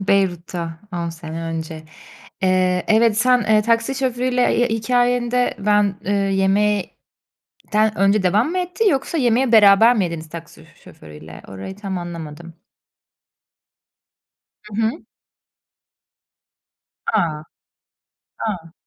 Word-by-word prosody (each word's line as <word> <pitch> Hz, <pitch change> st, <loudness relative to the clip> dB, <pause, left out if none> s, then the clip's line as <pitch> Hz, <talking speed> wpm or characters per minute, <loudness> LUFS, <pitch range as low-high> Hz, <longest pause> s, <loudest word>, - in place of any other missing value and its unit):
Beyrut'ta 175 Hz, -4 st, -1 dB
10 170 Hz, -1 st, -3 dB
sene 165 Hz, 0 st, -7 dB
önce. 160 Hz, -1 st, -5 dB, 0.6 s
Eee, 185 Hz, -1 st, +2 dB
evet, 220 Hz, 0 st, +3 dB
sen, 250 Hz, +1 st, +4 dB
eee, 215 Hz, 0 st, +3 dB
taksi 230 Hz, +4 st, +1 dB
şoförüyle 250 Hz, -1 st, 0 dB
hi 245 Hz, 0 st, +2 dB
hikayende, 245 Hz, +2 st, +1 dB
ben, 205 Hz, -1 st, +2 dB
eee, 200 Hz, -, -1 dB
yemekten 195 Hz, +1 st, 0 dB, 0.8 s
önce 195 Hz, +1 st, +3 dB
devam 205 Hz, -, +2 dB
mı 370 Hz, -, -2 dB
etti, 365 Hz, +4 st, 0 dB
yoksa 275 Hz, +4 st, -1 dB
yemeği 245 Hz, -1 st, +2 dB
beraber 220 Hz, +3 st, +6 dB
mi 200 Hz, -, +1 dB
yediniz 165 Hz, -2 st, -5 dB
taksi 165 Hz, 0 st, -10 dB
sö -, -, -17 dB, 0.2 s
şoförüyle? 80 Hz, +1 st, -13 dB
Orayı 95 Hz, -, -8 dB
tam 195 Hz, -3 st, -5 dB
anlamadım. 170 Hz, -1 st, -8 dB, 2.1 s
Hı 210 Hz, -1 st, -12 dB
hı. 220 Hz, -, +2 dB, 2.2 s
A! 165 Hz, -8 st, 0 dB, 1.0 s
A! 170 Hz, -6 st, -5 dB
200 Hz, 110 wpm, -20 LUFS, 170-235 Hz, 2.2 s, beraber